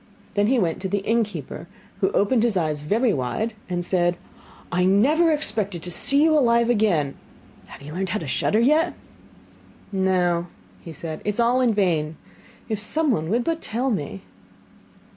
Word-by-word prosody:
Then 205 0 +2
he 260 +3 +2
went 175 -7 -1
to 190 - -3
the 200 0 -2
innkeeper, 225 -2 -2 0.3
who - - +2
opened 220 +4 +2
his 230 -4 +1
eyes 155 -4 -1
very 215 - +1
wide, 145 - -2 0.2
and 175 -1 -2
said: 175 -1 +1 0.5
'I 180 +1 +1
never 285 - +3
expected 210 - -1
to 180 - -6
see 280 - +4
you 320 0 +4
alive 235 -4 +3
again! 180 - +1 0.5
Have - - -13
you 150 +2 -9
learnt 190 +2 -3
how 210 - -1
to 165 - -6
shudder 145 - 0
yet?' 305 +8 +2 1.0
'No,' 180 -3 +1 0.4
said 160 0 -6
he, - - -3
'it - - 0
is - - -6
all 240 +2 +3
in 235 -4 +2
vain. 160 -6 0 0.5
If 215 -2 -2
someone 225 - +1
would 235 +4 +1
but 330 +2 -2
tell 250 +4 -2
me! 145 - -4
205 Hz, 170 wpm, -23 LUFS, 175-240 Hz, 1.0 s, see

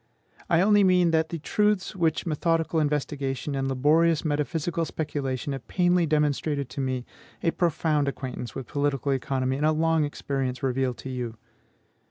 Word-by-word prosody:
I 170 -1 +4
only 205 +1 +5
mean 180 -2 +4
that 160 0 +2
the 170 - -3
truths 210 +4 0
which 165 -2 0
methodical 165 0 +1
investigation 145 -2 -1
and 135 -1 -1
laborious 155 +5 +3
metaphysical 155 +3 -1
speculation 145 -3 -3
have 135 -2 -7
painfully 175 -2 +2
demonstrated 150 -2 0
to 135 +2 -4
me, 130 -2 -2 0.4
a 165 - +3
profound 155 -4 +1
acquaintance 130 -4 -5
with 135 - -5
political 145 -1 -1
economy 130 0 -1
and 150 - 0
a - - +4
long 160 0 +2
experience 135 -3 -3
reveal 130 -1 0
to 135 - -8
you. 120 -3 -4
150 Hz, 155 wpm, -26 LUFS, 135-165 Hz, 0.4 s, only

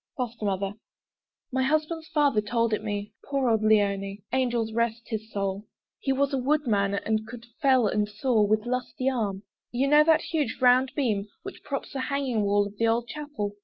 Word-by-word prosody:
FOSTER 235 -4 -3
MOTHER 195 0 -1 0.8
My 260 +1 0
husband's 310 +3 0
father 290 -9 +2
told 230 +1 0
it 215 - -1
me, 205 -1 -4
Poor 275 -2 -1
old 220 -1 +2
Leoni! 200 -2 +1
Angels 240 -4 0
rest 230 0 0
his 220 -1 -5
soul! 200 +1 -3 0.3
He 270 - -1
was 275 +1 +1
a 270 - +1
woodman, 245 -8 +1
and 215 +1 -1
could 235 0 -9 0.2
fell 260 -4 +4
and 210 0 0
saw 220 +2 +1
With 210 +1 +2
lusty 250 +1 -2
arm. 205 -6 -2 0.3
You 255 +3 +1
know 295 +1 +6
that 315 0 +4
huge 300 -8 -2
round 255 +1 +4
beam 215 -8 0 0.2
Which 390 -1 -8
props 275 -1 -5
the 275 - -3
hanging 265 -4 -1
wall 205 0 +2
of 205 0 -9
the 230 - +3
old 235 +1 0
chapel? 290 -9 -5
230 Hz, 185 wpm, -27 LUFS, 210-270 Hz, 0.8 s, know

